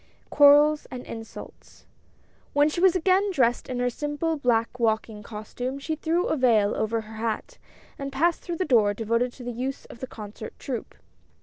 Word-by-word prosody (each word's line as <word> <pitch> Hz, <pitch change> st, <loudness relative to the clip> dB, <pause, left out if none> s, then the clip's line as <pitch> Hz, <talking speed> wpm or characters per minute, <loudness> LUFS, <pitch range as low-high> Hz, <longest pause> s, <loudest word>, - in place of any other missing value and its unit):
QUARRELS 295 Hz, +1 st, +6 dB
AND 255 Hz, -1 st, -7 dB
INSULTS. 225 Hz, -1 st, -10 dB, 0.7 s
W 290 Hz, -, +4 dB
HEN -, -, +3 dB
she 345 Hz, -, -3 dB
was 375 Hz, -1 st, +5 dB
again 375 Hz, +3 st, +3 dB
dressed 255 Hz, -10 st, +1 dB
in 255 Hz, -, -3 dB
her 245 Hz, 0 st, 0 dB
simple 295 Hz, +4 st, -2 dB
black 245 Hz, -3 st, 0 dB
walking 220 Hz, -2 st, 0 dB
costume 230 Hz, +5 st, -5 dB
she 280 Hz, +3 st, -3 dB
threw 330 Hz, +3 st, 0 dB
a -, -, 0 dB
vail 225 Hz, -7 st, +3 dB
over 225 Hz, +1 st, -1 dB
her 220 Hz, 0 st, -11 dB
hat, 225 Hz, -, -3 dB, 0.4 s
and 275 Hz, 0 st, -4 dB
passed 330 Hz, +5 st, +1 dB
through 340 Hz, -1 st, -5 dB
the 370 Hz, -, 0 dB
door 215 Hz, -7 st, +3 dB
devoted 230 Hz, +3 st, 0 dB
to 255 Hz, -, -11 dB
the 245 Hz, -, -4 dB
use 260 Hz, +3 st, -4 dB
of -, -, -13 dB
the 260 Hz, -, -5 dB
concert 215 Hz, -1 st, -9 dB
troupe. 250 Hz, -4 st, -5 dB
250 Hz, 185 wpm, -26 LUFS, 225-300 Hz, 0.7 s, QUARRELS